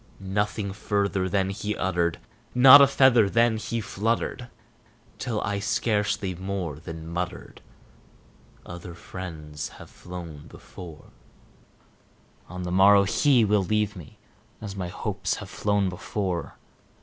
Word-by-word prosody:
Nothing 100 +1 -2
further 100 -2 -1
then 95 0 0
he 105 +2 -4
uttered 85 -3 0 0.4
not 130 +3 +10
a 140 - +8
feather 125 -6 +4
then 115 +1 +3
he 115 +2 -3
fluttered 115 +4 -2 0.7
Till 115 -4 -2
I 100 0 -2
scarcely 105 -2 0
more 90 -4 -4
than 80 -1 -8
muttered, 85 +2 -5 1.0
"Other 85 0 -9
friends 80 -5 -7
have - - -13
flown 85 -5 -9
before 80 -4 -12 1.4
On 90 +1 -6
the 90 - -4
morrow 100 +2 +6
he 125 +4 +3
will 105 -1 +2
leave 105 +2 0
me, 85 -6 -12 0.4
as 100 -2 -7
my 95 -2 -4
hopes 85 - -3
have - - -9
flown 100 -1 0
before." 90 -1 -4
100 Hz, 125 wpm, -26 LUFS, 90-105 Hz, 1.4 s, not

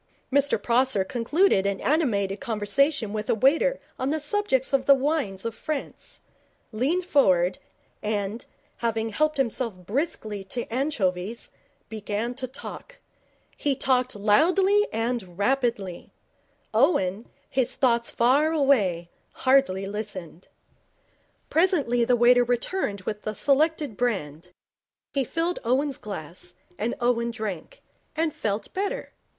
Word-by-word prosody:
Mr 280 -4 +3
Prosser 240 -2 +2
concluded 235 - +2
an 200 -1 -1
animated 210 -11 +1
conversation 230 +1 0
with 215 0 -4
a - - +3
waiter 320 - +3 0.2
on 260 - -1
the 315 +2 0
subject 300 -5 +1
of 270 -1 +1
the 280 - +8
wines 265 -9 -1
of 230 - -2
France, 300 +5 -6 0.5
leaned 285 +12 0
forward, 185 - +3 0.4
and, 210 +1 -3 0.3
having 225 -1 -1
helped 305 +7 0
himself 240 -4 -1
briskly 215 - -2
to 235 +5 -4
anchovies, 225 -6 -1 0.4
began 215 +2 -3
to 260 +1 -5
talk. - - -9 0.6
He 285 -2 0
talked 255 -2 +1
loudly 365 - +3
and 225 -6 -3
rapidly. 220 -5 -1 0.6
Owen, 220 - +2 0.2
his 260 -1 0
thoughts 235 -3 +2
far 275 +7 +3
away, 210 - +2 0.2
hardly 260 -8 +2
listened. 195 -4 -6 1.0
Presently 295 -8 +2
the 245 - +3
waiter 245 +1 +5
returned 240 - -1
with 210 +2 -4
the 215 - -4
selected 290 -3 +1
brand. 180 -9 -2 0.6
He 275 - +1
filled 330 +7 -1
Owen's 265 +3 0
glass, 180 -4 -8 0.2
and 235 +2 -1
Owen 240 -1 +1
drank, 215 -8 -6 0.3
and 320 -1 0
felt 205 -1 -3
better. 395 +1 -3
240 Hz, 120 wpm, -25 LUFS, 205-280 Hz, 1.0 s, the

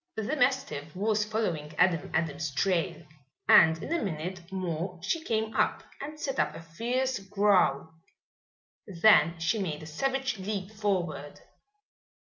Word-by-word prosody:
The 220 +7 -2
mastiff 250 - 0
was 215 +2 +1
following 175 -9 -2
Adam 180 -3 +2
Adams' 155 -2 -1
trail 175 0 0 0.4
and 160 0 +7
in - - -3
a 340 - 0
minute 175 0 -5
more 180 -1 -3
she 315 - -1
came 220 -3 -1
up - - +1 0.2
and 300 +2 -7
set 270 -3 -3
up - - +1
a - - -7
fierce 245 +10 -1
growl. 195 -7 +2 0.9
Then 170 -3 +5
she 165 +7 0
made 155 -5 -3
a - - -8
savage 265 - -2
leap 195 0 -4
forward. 175 -9 -2
190 Hz, 135 wpm, -29 LUFS, 165-220 Hz, 0.9 s, and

